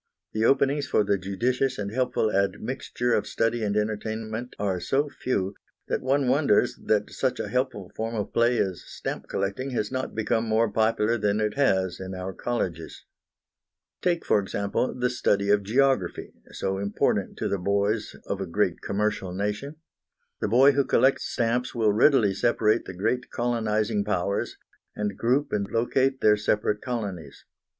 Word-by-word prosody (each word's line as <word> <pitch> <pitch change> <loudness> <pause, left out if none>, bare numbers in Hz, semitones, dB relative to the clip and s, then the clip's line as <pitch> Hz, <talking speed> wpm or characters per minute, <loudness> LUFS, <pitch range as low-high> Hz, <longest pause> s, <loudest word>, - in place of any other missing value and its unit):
The 110 +1 +1
openings 140 +2 +2
for 120 - +3
the 100 -1 +1
judicious 125 +8 0
and 100 -1 -3
helpful 125 -3 +1
admixture 115 +5 -1
of - - +1
study 115 0 0
and 105 0 0
entertainment 110 +2 -3
are 95 -3 -1
so 140 +9 0
few, 100 -8 -2 0.4
that - - 0
one 135 +1 +1
wonders 130 -4 +3
that 105 -1 +1
such 130 -2 -1
a - - -3
helpful 125 -7 -2
form 115 +1 -3
of 105 -2 -3
play 120 +1 +3
as 95 -5 -1
stamp - - -6
collecting 100 +8 -2
has 105 - -1
not 130 0 -3
become 115 +1 0
more 110 0 +2
popular 110 +1 +2
than 105 0 +1
it 105 -1 0
has 95 -10 +1
in 95 0 -6
our 95 +1 -5
colleges. 90 -10 -4 1.0
Take, 175 -2 0
for - - +4
example, 100 +4 -1
the 125 0 0
study 100 -5 +1
of 105 0 +4
geography, 120 -2 +1 0.2
so 95 0 -2
important 100 +1 0
to - - -1
the 100 - -1
boys 100 +3 0
of 100 -1 -3
a 95 - -3
great 90 0 0
commercial 100 -3 -1
nation. 105 +9 -3 0.6
The - - -1
boy 130 +6 +6
who 140 0 +2
collects 130 +1 +3
stamps 120 +2 -1
will 110 -3 +3
readily 110 -3 +4
separate 110 +1 +2
the 95 - -8
great 125 +7 -1
colonising 110 -3 0
powers, 100 -1 -1 0.4
and 105 -2 -2
group 130 +7 +1
and 100 -1 -1
locate 130 +4 +1
their 105 -1 +5
separate 105 0 0
colonies. 105 -9 -5
110 Hz, 160 wpm, -26 LUFS, 100-125 Hz, 1.0 s, boy